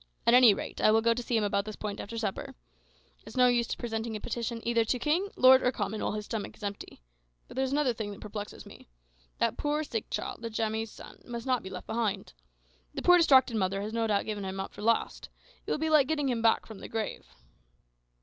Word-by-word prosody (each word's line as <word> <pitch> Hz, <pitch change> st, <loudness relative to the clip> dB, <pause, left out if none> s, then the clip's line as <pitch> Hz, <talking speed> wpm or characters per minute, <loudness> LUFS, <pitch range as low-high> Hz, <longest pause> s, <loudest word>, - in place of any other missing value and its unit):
At 235 Hz, -, +5 dB
any 250 Hz, -3 st, +8 dB
rate -, -, -6 dB
I -, -, +5 dB
will 220 Hz, +1 st, +4 dB
go 230 Hz, 0 st, +4 dB
to 245 Hz, -, -4 dB
see 235 Hz, -1 st, 0 dB
him 220 Hz, -, +1 dB
about 200 Hz, -1 st, +1 dB
this 215 Hz, 0 st, -7 dB
point 210 Hz, -1 st, -5 dB
after 230 Hz, +3 st, -6 dB
supper. 215 Hz, -4 st, -4 dB, 0.6 s
It's -, -, -13 dB
of -, -, -8 dB
no 250 Hz, -, +6 dB
use 240 Hz, -1 st, +1 dB
presenting 225 Hz, -1 st, -4 dB
a -, -, -4 dB
petition 235 Hz, +1 st, -3 dB
either 235 Hz, -1 st, +3 dB
to 235 Hz, +3 st, 0 dB
king, 320 Hz, +10 st, 0 dB
lord, 260 Hz, +1 st, +7 dB
or 250 Hz, -, +2 dB
common 215 Hz, -2 st, -3 dB
while -, -, -1 dB
his 210 Hz, 0 st, -4 dB
stomach 220 Hz, -2 st, -5 dB
is -, -, -15 dB
empty. 200 Hz, -, -6 dB, 0.4 s
But -, -, -12 dB
there 265 Hz, -, 0 dB
is 265 Hz, -, -1 dB
another 280 Hz, -3 st, +2 dB
thing 220 Hz, -2 st, -5 dB
that 200 Hz, -, -9 dB
perplexes 210 Hz, -1 st, -7 dB
me: -, -, -14 dB, 0.5 s
that -, -, 0 dB
poor 300 Hz, +1 st, 0 dB
sick 225 Hz, -7 st, -4 dB
child, -, -, -4 dB
Njamie's 220 Hz, -1 st, -2 dB
son, -, -, -13 dB
must 235 Hz, -1 st, -6 dB
not 255 Hz, -2 st, +1 dB
be 190 Hz, -, -8 dB
left 185 Hz, -1 st, -8 dB
behind. 215 Hz, -, -2 dB, 0.6 s
The -, -, -4 dB
poor 355 Hz, 0 st, +7 dB
distracted 265 Hz, -7 st, +5 dB
mother 195 Hz, -1 st, 0 dB
has 215 Hz, +1 st, -5 dB
no 230 Hz, -1 st, 0 dB
doubt 205 Hz, -2 st, +1 dB
given 210 Hz, -2 st, -4 dB
him 190 Hz, 0 st, -5 dB
up 195 Hz, -, -5 dB
for -, -, -10 dB
lost. 230 Hz, +2 st, 0 dB, 0.4 s
It -, -, -4 dB
will -, -, +1 dB
be 315 Hz, +1 st, -1 dB
like 295 Hz, -4 st, +5 dB
getting 295 Hz, -3 st, 0 dB
him 235 Hz, -2 st, -1 dB
back 225 Hz, 0 st, +3 dB
from 220 Hz, -3 st, -10 dB
the -, -, -9 dB
grave." 220 Hz, -1 st, -4 dB
225 Hz, 240 wpm, -29 LUFS, 210-250 Hz, 0.6 s, any